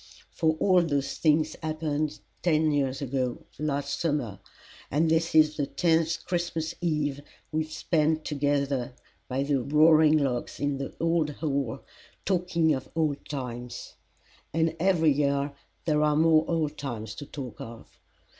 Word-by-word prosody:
For 160 -1 +1
all 185 -2 +5
those 140 -4 -1
things 155 0 +2
happened 155 -1 -2 0.2
ten 155 -2 +3
years 140 -1 0
ago 130 -2 -2
last 145 -1 -2
summer, 145 - -1 0.5
and 160 +3 +2
this 165 0 +1
is 155 -1 +5
the 145 -2 0
tenth 160 +3 +1
Christmas 170 -2 -2
Eve 150 -4 0 0.3
we 155 0 +1
have 155 - -16
spent 155 0 +1
together 140 -3 0 0.3
by 135 +1 -1
the 140 -2 +1
roaring 155 +3 +5
logs 135 -5 -2
in 145 -1 -1
the 135 - -5
old 165 -2 +1
hall, 140 -5 -2 0.4
talking 175 -4 +2
of 130 -2 -4
old 155 -3 0
times; 125 -3 -6 0.6
and 165 0 +1
every 165 -3 +4
year 140 0 +1 0.3
there 150 -2 +2
are 150 -1 +3
more 160 0 +4
old 155 -3 -1
times 110 -6 -5
to 145 - -8
talk 130 -6 -7
of. 115 0 -11
150 Hz, 145 wpm, -27 LUFS, 140-160 Hz, 0.6 s, all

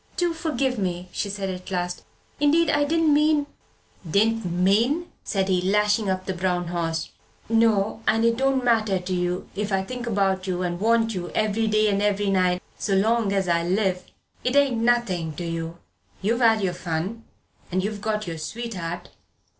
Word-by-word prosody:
"Do 350 -1 +1
forgive 275 -7 -1
me!" 180 -1 -3
she 205 - -3
said 195 -1 -3
at 180 +1 -8
last. 180 -1 -2 0.4
"Indeed, 300 +2 +4
I 290 0 +2
didn't 320 0 +3
mean 300 0 +3 0.3
" 170 - -15
"Didn't 225 -1 +2
mean," 210 - +1
said 195 -2 -1
he, 185 -2 +2
lashing 210 +2 +2
up 185 0 -1
the 190 - -2
brown 180 -1 -1
horse; 165 -2 -2 0.4
"no 220 -2 +2
and 225 +1 +3
it 230 0 +3
don't 265 +1 +1
matter 220 -5 +2
to 180 +1 -4
you 180 0 -1
if 210 +1 -3
I 190 0 +1
think 245 +3 -6
about 195 -3 0
you 180 -1 -1
and 175 -1 -2
want 225 +1 +2
you 175 -2 -4
every 215 +1 +1
day 215 0 +3
and 200 -1 +1
every 205 -1 +1
night 180 -1 +2 0.2
so 195 - 0
long 220 +1 +2
as 195 -2 0
I 170 -1 +2
live. 185 +1 0 0.4
It 250 +2 0
ain't 280 -4 +4
nothing 195 -10 +1
to 175 - -5
you. 165 0 -4 0.5
You've 230 +5 +1
had 225 -2 +5
your 185 -2 0
fun. 180 +6 -4 0.5
And 185 +1 0
you've 205 0 -3
got 215 0 -1
your 165 -2 -5
sweetheart. 180 -3 -5
200 Hz, 185 wpm, -24 LUFS, 180-230 Hz, 0.5 s, had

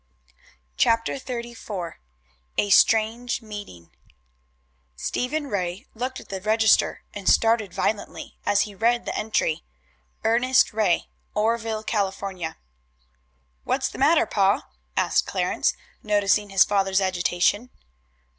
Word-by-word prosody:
CHAPTER 230 0 +2
XXXIV 235 -8 -6 0.6
A 205 - +1
STRANGE 225 +4 +3
MEETING 205 - -9 1.0
Stephen 280 - -2
Ray 185 -6 -3
looked 255 +3 -4
at - - -15
the 195 -1 -5
register, 220 +1 +3
and 200 -2 -1
started 225 -3 +3
violently 210 -1 -3
as 200 - +3
he 210 - -3
read 235 +4 +1
the - - -3
entry: 210 -7 0 0.6
"Ernest 245 +2 +3
Ray, 210 -5 +2 0.3
Oreville, 225 0 0
California." 195 -5 -3 1.1
"What's - - 0
the - - -10
matter, - - +4
pa?" - - +2 0.3
asked - - +2
Clarence, - - 0 0.3
noticing 205 0 +2
his 195 -2 +6
father's 195 -1 +1
agitation. 185 +4 +1
210 Hz, 110 wpm, -24 LUFS, 195-230 Hz, 1.1 s, his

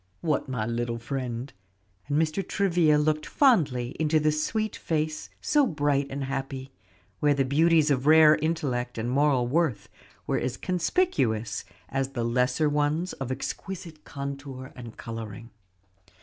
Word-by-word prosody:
"What, 155 -5 0
my 120 -5 -2
little 115 0 -2
friend?" 125 +1 -4 0.5
and 145 +1 +1
Mr. 160 +4 +1
Travilla 175 -6 +2
looked 155 +1 +1
fondly 145 - +2
into 155 0 +3
the 155 0 +2
sweet 215 +8 -1
face 155 -1 -2
so 295 -3 +3
bright 145 -4 +1
and 135 +1 -4
happy, 135 0 -4 0.5
where 145 -1 +3
the 135 -1 +1
beauties 155 +2 +4
of 135 0 0
rare 155 0 +8
intellect 135 -7 -2
and 110 +1 -2
moral 135 -2 +3
worth 135 -7 0 0.4
were - - 0
as 125 0 -3
conspicuous 175 - 0 0.2
as 135 0 -2
the 120 -3 -2
lesser 125 +5 +2
ones 150 +4 0
of 130 -1 -5
exquisite 165 +4 -6
contour 140 -1 -7
and 120 -3 -10
coloring. 115 -1 -7
140 Hz, 140 wpm, -27 LUFS, 125-155 Hz, 0.5 s, rare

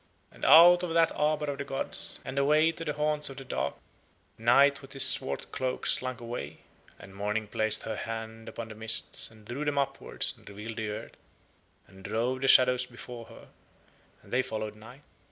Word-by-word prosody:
And - - -17
out 175 +2 +8
of 170 -2 -3
that 165 -1 +4
arbour 150 -1 0
of 140 - -8
the - - -2
gods, 135 -1 -4
and 130 +1 -3
away 155 +3 +4
to 165 0 -7
the 150 -2 -2
haunts 150 0 0
of 135 - -10
the 135 - -8
dark, - - -2 0.6
Night 135 +5 +4
with 135 - -12
his 135 - +5
swart - - +1
cloak 130 -1 -3
slunk 130 -1 0
away; 115 - -7 0.4
and 95 - -13
Morning 105 +2 -2
placed 110 +1 0
her 110 - -4
hand 115 0 -6
upon 115 -1 -7
the - - -8
mists 110 +1 +1
and 110 -1 -18
drew 125 +7 -4
them 145 -1 -1
upward 140 -1 -2
and - - -15
revealed 105 +2 -8
the 110 -1 -3
earth, 105 - -7 0.7
and 95 0 -17
drove 115 +6 -1
the 135 - +1
shadows 125 -1 +6
before 120 -1 -10
her, - - -15 0.7
and - - -14
they 130 - +3
followed 110 -3 -5
Night. 120 +6 -14
125 Hz, 190 wpm, -29 LUFS, 110-140 Hz, 0.7 s, out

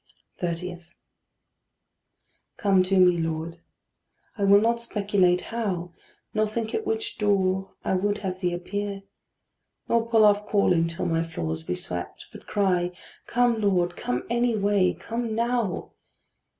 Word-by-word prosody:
30. 175 +1 -3 1.8
Come 195 -3 +3
to 190 +1 +1
me, 180 -2 +5
Lord: 165 +1 -3 0.8
I 200 - 0
will 200 +1 +7
not 235 +2 +1
speculate 200 -5 +2
how, 185 -7 -2 0.4
Nor 215 0 +2
think 220 +1 -3
at 440 - -2
which 440 -1 -2
door 190 -2 +1
I - - +1
would 205 +2 +1
have 185 -1 -3
thee 180 -2 0
appear, 195 +3 -4 0.8
Nor 230 0 +1
put 225 -2 +5
off 210 0 +4
calling 180 -5 +3
till 165 0 -4
my 165 -1 +1
floors 80 - -4
be 90 +2 -3
swept, 90 -1 -6
But - - -13
cry, 180 -3 +1 0.3
"Come, 240 -2 +2
Lord, 180 -4 +1
come 125 -5 -2
any 235 -1 +1
way, 200 -2 +2
come 230 -1 -4
now." 235 -4 -1
195 Hz, 135 wpm, -26 LUFS, 175-220 Hz, 1.8 s, will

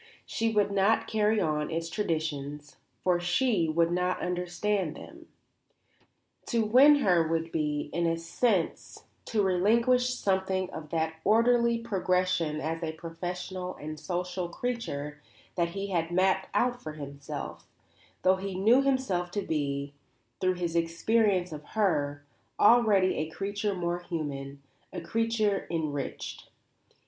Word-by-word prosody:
She 225 0 -1
would 205 -2 +2
not 200 +3 +3
carry 215 0 +2
on 150 -4 0
its 165 0 -2
traditions, 150 -6 -3 0.3
for 180 -1 +3
she 180 0 +1
would 165 +2 +2
not 180 +1 0
understand 180 0 -1
them. - - -12 1.2
To 230 -3 +1
win 265 +7 +7
her 180 - +3
would 165 0 -1
be, 150 -2 -2
in 170 0 +1
a 165 0 +1
sense, 175 +2 -1 0.2
to 215 -2 +1
relinquish 235 +7 +3
something 190 -3 0
of 155 -1 -8
that 160 0 -1
orderly 235 +2 +4
progression 185 -7 0
as 165 +2 -3
a 160 -1 -3
professional 180 +3 -5
and 155 +1 -7
social 180 +1 -3
creature 150 -11 -4 0.3
that 170 -1 0
he 200 0 -3
had 165 -2 0
mapped 190 +2 +2
out 245 0 +1
for 155 - -6
himself, 140 -2 -7 0.6
though 185 +1 +4
he 195 0 -5
knew 225 +8 +5
himself 260 -10 0
to 200 +3 -3
be, 140 -3 -2 0.5
through 185 0 +1
his 170 -2 -3
experience 180 +2 +2
of 150 -1 -7
her, 145 -8 +1 0.3
already 210 -4 +5
a 155 +1 -2
creature 200 +3 -2
more 175 -1 -2
human, 140 -5 -5 0.3
a 180 - -5
creature 215 +2 0
enriched. 155 -4 -4
180 Hz, 135 wpm, -29 LUFS, 160-210 Hz, 1.2 s, win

